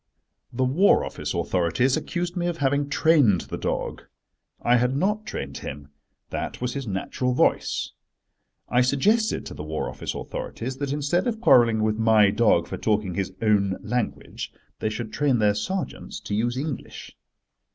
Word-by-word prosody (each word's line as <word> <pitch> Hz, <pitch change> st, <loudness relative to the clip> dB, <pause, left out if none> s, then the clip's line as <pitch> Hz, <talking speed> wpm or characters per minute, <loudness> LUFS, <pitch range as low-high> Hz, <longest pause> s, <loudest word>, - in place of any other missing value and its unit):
The 130 Hz, +2 st, -1 dB
War 150 Hz, +11 st, +4 dB
Office -, -, -4 dB
authorities 95 Hz, +9 st, +1 dB
accused 175 Hz, 0 st, -3 dB
me 175 Hz, -1 st, -1 dB
of 175 Hz, -1 st, -2 dB
having 140 Hz, 0 st, +1 dB
trained 145 Hz, -, +4 dB
the -, -, -6 dB
dog. -, -, -2 dB, 0.6 s
I 120 Hz, +1 st, +4 dB
had 125 Hz, +3 st, +1 dB
not 210 Hz, +6 st, 0 dB
trained 70 Hz, 0 st, -5 dB
him: 70 Hz, 0 st, -7 dB, 0.4 s
that -, -, -4 dB
was 125 Hz, 0 st, -2 dB
his 140 Hz, -3 st, -4 dB
natural 115 Hz, +6 st, -1 dB
voice. -, -, +1 dB, 0.8 s
I 125 Hz, -, +3 dB
suggested 205 Hz, -, +2 dB
to -, -, -7 dB
the -, -, -8 dB
War 75 Hz, 0 st, -3 dB
Office -, -, -5 dB
authorities 130 Hz, +3 st, -5 dB
that 140 Hz, 0 st, -3 dB
instead 150 Hz, -, 0 dB
of 225 Hz, -2 st, -1 dB
quarrelling 115 Hz, -, +5 dB
with 110 Hz, 0 st, 0 dB
my 110 Hz, -3 st, +5 dB
dog 100 Hz, -7 st, +3 dB
for -, -, -5 dB
talking 105 Hz, -4 st, 0 dB
his 95 Hz, 0 st, -2 dB
own 100 Hz, -3 st, +2 dB
language, 120 Hz, -2 st, -3 dB, 0.3 s
they 110 Hz, -, 0 dB
should 110 Hz, +1 st, -5 dB
train 140 Hz, -4 st, +2 dB
their 105 Hz, -2 st, +3 dB
sergeants 185 Hz, -, -4 dB
to -, -, -5 dB
use 120 Hz, +4 st, 0 dB
English. 145 Hz, 0 st, -6 dB
125 Hz, 160 wpm, -25 LUFS, 105-145 Hz, 0.8 s, quarrelling